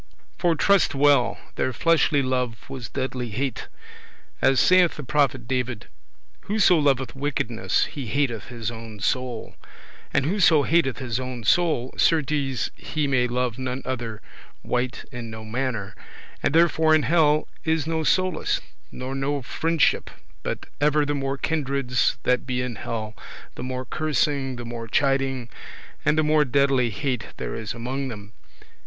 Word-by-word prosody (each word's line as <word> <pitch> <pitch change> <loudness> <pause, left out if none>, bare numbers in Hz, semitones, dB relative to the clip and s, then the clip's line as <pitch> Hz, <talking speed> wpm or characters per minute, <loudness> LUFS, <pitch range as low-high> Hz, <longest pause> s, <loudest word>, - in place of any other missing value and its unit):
For 175 -2 +3
trust 195 -2 +3
well, 140 -4 +4 0.2
their 130 - +1
fleshly 155 -3 +3
love 125 -3 -2
was 130 -4 -6
deadly 130 -2 -3
hate; 130 +4 -3 0.7
as 135 0 +4
saith 185 -2 +5
the 150 - -6
prophet 135 -3 +1
David; 125 -3 -2 0.6
"Whoso 200 -5 +4
loveth 135 -3 +1
wickedness, 135 -5 0
he 135 -5 -6
hateth 130 -4 -1
his 120 -3 -4
own 115 -2 -9
soul:" 125 +2 -2 0.6
and 135 - +2
whoso 165 -4 +4
hateth 160 -4 +2
his 125 -3 -2
own 130 -2 -5
soul, 145 0 +2
certes 145 -5 +1
he 155 -2 -2
may 130 -3 +2
love 125 0 -1
none 130 0 -3
other 120 -4 -4 0.4
wight 125 0 -2
in 120 -2 -6
no 110 0 -8
manner: 110 -3 -3 0.5
and 150 - +1
therefore 160 -1 +5
in 155 - +2
hell 155 -2 +3 0.2
is 160 -2 +1
no 160 0 -1
solace 185 +1 +1 0.3
nor 130 +1 -5
no 135 0 -1
friendship, 165 +4 +1 0.3
but - - -4 0.2
ever 150 0 +3
the 145 - -1
more 135 -1 -2
kindreds 135 -4 0
that 125 0 +1
be 125 -1 -1
in 125 -1 -3
hell, 110 0 -4 0.4
the - - -8
more 130 0 -4
cursing, 140 -2 0
the 120 0 -7
more 115 -1 -6
chiding, 135 0 +1 0.6
and 155 - +2
the 155 - +4
more 150 0 +4
deadly 135 -2 +2
hate 125 +2 -2
there - - -4
is 110 0 -4
among 130 +4 -3
them. 105 -3 -8
135 Hz, 150 wpm, -24 LUFS, 120-150 Hz, 0.7 s, saith